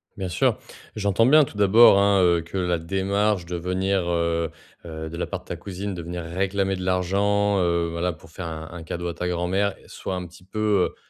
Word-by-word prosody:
Bien 95 -2 -4
sûr. 85 - +1 0.4
J'entends 105 +2 +2
bien, 155 +2 +7
tout 110 - -7
d'abord, 100 0 +7
hein, 100 -1 +4
heu, 85 -1 +3
que 85 +4 -7
la 90 -2 0
démarche 95 +2 0
de 90 +1 -5
venir, 90 +1 -1
heu 85 -1 0 0.4
heu, 80 -1 -6
de 85 - -6
la - - -2
part - - -5
de - - -26
ta - - -5
cousine 95 +2 -5
de 85 - -6
venir 85 +1 -5
réclamer 95 +3 -1
de 90 - -6
l'argent, 100 +2 +1
heu, 85 -1 +1
voilà, 85 +1 -1
pour 80 +1 -17
faire 85 0 -6
un 80 -1 -6
un 90 -2 -8
cadeau 85 +2 -4
à - - -4
ta 90 +3 -3
grand-mère 90 +3 0
soit 95 - -5
un 90 -1 -4
petit 90 +1 -15
peu, 105 -1 +1
heu, - - -20
90 Hz, 220 wpm, -24 LUFS, 85-100 Hz, 0.4 s, bien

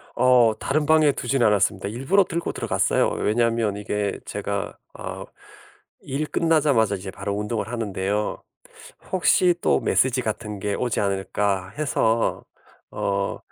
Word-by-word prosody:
어 125 -2 +5
다른 150 +2 0
방에 155 -1 +5
두진 135 0 -1
않았습니다. 100 -2 +2
일부러 135 - +2
들고 170 -1 -3
들어갔어요. - - +1
왜냐하면 115 -1 +1
이게 105 0 -2
제가 - - -4 0.2
어 - - -6 0.8
일 145 +3 -2
끝나자마자 145 -12 +2
이제 95 0 -7
바로 100 +1 -4
운동을 105 +1 -2
하는데요. 105 -2 -2 0.7
혹시 180 -1 +4
또 - - +3
메시지 130 0 +2
같은 105 -2 -4
게 100 +1 -1
오지 120 +1 -1
않을까 100 -1 -1
해서. 115 -6 0 0.5
어 100 0 -1
115 Hz, 290 characters per minute, -23 LUFS, 100-135 Hz, 0.8 s, 어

